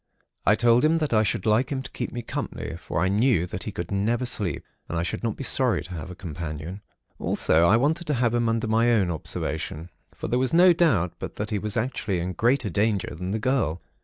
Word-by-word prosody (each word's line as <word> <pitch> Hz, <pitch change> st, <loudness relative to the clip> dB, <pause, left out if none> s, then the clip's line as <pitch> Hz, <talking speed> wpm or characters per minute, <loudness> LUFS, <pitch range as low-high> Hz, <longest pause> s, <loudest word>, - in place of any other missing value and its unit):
I 105 Hz, -, +6 dB
told 120 Hz, +2 st, +4 dB
him 160 Hz, +2 st, +4 dB
that 155 Hz, -6 st, -1 dB
I 110 Hz, -, +5 dB
should 100 Hz, -3 st, -1 dB
like 110 Hz, +5 st, +2 dB
him 135 Hz, -1 st, -2 dB
to 135 Hz, -, -9 dB
keep -, -, -4 dB
me 120 Hz, -1 st, -5 dB
company, -, -, -5 dB
for -, -, -4 dB
I 95 Hz, -, +3 dB
knew 105 Hz, -2 st, +2 dB
that 90 Hz, 0 st, -6 dB
he 105 Hz, -, -3 dB
could 85 Hz, -1 st, -6 dB
never 115 Hz, +6 st, 0 dB
sleep, 105 Hz, -7 st, -2 dB, 0.2 s
and 85 Hz, -, -2 dB
I 85 Hz, -, 0 dB
should 85 Hz, -, -3 dB
not 115 Hz, -3 st, -1 dB
be -, -, -5 dB
sorry 130 Hz, -7 st, +3 dB
to 90 Hz, -, -12 dB
have 80 Hz, 0 st, -6 dB
a 90 Hz, -, -8 dB
companion. 85 Hz, +2 st, -6 dB, 0.4 s
Also, 80 Hz, +2 st, +2 dB
I 110 Hz, -, +5 dB
wanted 160 Hz, +7 st, 0 dB
to 150 Hz, -, +1 dB
have 120 Hz, -1 st, +1 dB
him 120 Hz, -1 st, +1 dB
under 115 Hz, +1 st, 0 dB
my 115 Hz, +2 st, +3 dB
own 100 Hz, -6 st, +2 dB
observation; 80 Hz, +1 st, -3 dB, 0.2 s
for -, -, -5 dB
there 125 Hz, -, +1 dB
was 130 Hz, +5 st, +1 dB
no 180 Hz, +1 st, +7 dB
doubt 105 Hz, -, +2 dB
but -, -, -6 dB
that 105 Hz, +1 st, -4 dB
he 105 Hz, -, 0 dB
was 105 Hz, +2 st, -3 dB
actually 110 Hz, -5 st, -1 dB
in 90 Hz, +2 st, -3 dB
greater 120 Hz, 0 st, +1 dB
danger 100 Hz, +1 st, 0 dB
than 90 Hz, +3 st, -5 dB
the 105 Hz, -, -1 dB
girl. 110 Hz, -, 0 dB
110 Hz, 240 wpm, -25 LUFS, 90-125 Hz, 0.4 s, no